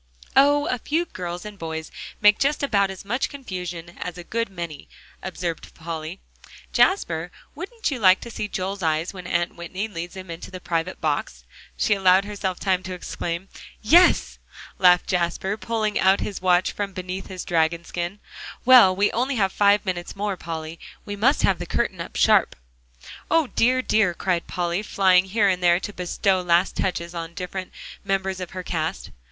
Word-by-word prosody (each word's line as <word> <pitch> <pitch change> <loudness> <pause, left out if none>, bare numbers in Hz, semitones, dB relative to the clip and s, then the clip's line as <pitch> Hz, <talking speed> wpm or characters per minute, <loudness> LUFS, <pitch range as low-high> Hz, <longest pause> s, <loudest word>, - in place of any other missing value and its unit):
"Oh! 290 +2 +5
a 250 - -1
few 320 +8 0
girls 175 - -6
and 210 -2 -9
boys 160 -1 -5 0.3
make 210 0 +6
just 285 +1 +1
about 200 -8 +2
as 190 0 -8
much 240 +6 -1
confusion 180 - -7
as 180 0 -5
a 175 - -7
good 230 +5 -2
many," 170 -6 -7 0.3
observed 175 -3 -5
Polly. 165 +2 -6 0.5
"Jasper, 175 - +2 0.2
wouldn't 395 +5 -4
you 260 - -3
like 190 -3 +6
to 235 - -8
see 210 - -3
Joel's 195 0 -4
eyes 160 +2 0
when 180 -2 -8
Aunt 175 0 0
Whitney 185 +5 -4
leads 175 -3 -7
him 185 -2 -8
into 165 +2 -8
the 185 0 -8
private 170 +1 -2
box?" 145 - -2 0.3
she - - +2
allowed 190 0 +4
herself 195 -3 -3
time 185 -2 +1
to 185 0 -6
exclaim. 175 +1 -5 0.4
"Yes," 345 +10 +5 0.4
laughed 180 -1 +6
Jasper, 180 +2 -1
pulling 220 -1 -1
out 190 +1 +4
his 200 - -4
watch 180 0 +3
from 200 -1 -4
beneath 185 +1 -5
his 185 -2 -7
dragon 170 -1 +1
skin; 175 +3 -4 0.5
"well, 240 -8 +8
we 200 +2 +3
have - - -9
only 255 +2 0
five 205 +2 +3
minutes 180 -2 -4
more, 200 0 -2
Polly. 160 -1 -6 0.3
We 205 - -5
must 255 +8 +2
have 190 - +3
the 175 - -5
curtain - - -1
up - - -8
sharp." - - +4 0.7
"O 330 -1 +4
dear, 255 +1 +2
dear!" 205 -8 +2
cried 175 -2 -1
Polly, 175 +1 -1
flying 190 -3 +3
here 205 +2 +2
and 185 -2 +1
there 175 0 +4
to 205 - -6
bestow 185 +1 0
last 175 +1 +2
touches 170 -2 -2
on 165 -1 -5
the 170 - -25
different 185 0 -5 0.3
members 195 -1 -1
of 180 -2 -5
her 185 -1 -6
cast. 160 -3 -3
185 Hz, 180 wpm, -24 LUFS, 175-205 Hz, 0.7 s, well